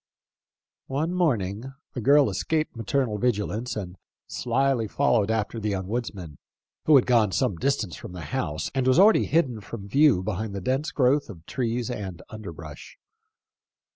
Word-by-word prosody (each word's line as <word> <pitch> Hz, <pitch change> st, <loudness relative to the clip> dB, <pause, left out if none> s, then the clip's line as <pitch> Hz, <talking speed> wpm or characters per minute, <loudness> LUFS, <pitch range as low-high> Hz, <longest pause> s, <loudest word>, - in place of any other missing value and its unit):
One 150 Hz, +6 st, -1 dB
morning 125 Hz, -, 0 dB, 0.2 s
the 125 Hz, -, -4 dB
girl 140 Hz, +3 st, +5 dB
escaped 155 Hz, -, -1 dB
maternal 115 Hz, -1 st, -1 dB
vigilance, 115 Hz, 0 st, -1 dB
and 95 Hz, -3 st, -6 dB, 0.3 s
slyly 135 Hz, -4 st, 0 dB
followed 115 Hz, -4 st, +2 dB
after 110 Hz, +1 st, -1 dB
the 105 Hz, 0 st, -2 dB
young 95 Hz, -2 st, -2 dB
wood 120 Hz, +4 st, -2 dB
man, 85 Hz, -7 st, -9 dB, 0.5 s
who 155 Hz, -, +6 dB
had 130 Hz, -, +6 dB
gone 115 Hz, -5 st, +3 dB
some 90 Hz, -, +1 dB
distance 115 Hz, -, -1 dB
from -, -, -9 dB
the 90 Hz, -, -7 dB
house, 75 Hz, +1 st, -2 dB
and 130 Hz, -1 st, 0 dB
was 130 Hz, -, +4 dB
already 205 Hz, +4 st, +6 dB
hidden 130 Hz, -9 st, +1 dB
from 100 Hz, -1 st, -8 dB
view 135 Hz, -4 st, +4 dB
behind 105 Hz, +1 st, -3 dB
the -, -, -2 dB
dense 130 Hz, +9 st, 0 dB
growth 140 Hz, 0 st, +2 dB
of 85 Hz, -6 st, -11 dB
trees 120 Hz, +1 st, -2 dB
and 95 Hz, -7 st, -6 dB
underbrush. 85 Hz, -8 st, -9 dB
115 Hz, 160 wpm, -26 LUFS, 100-135 Hz, 0.5 s, who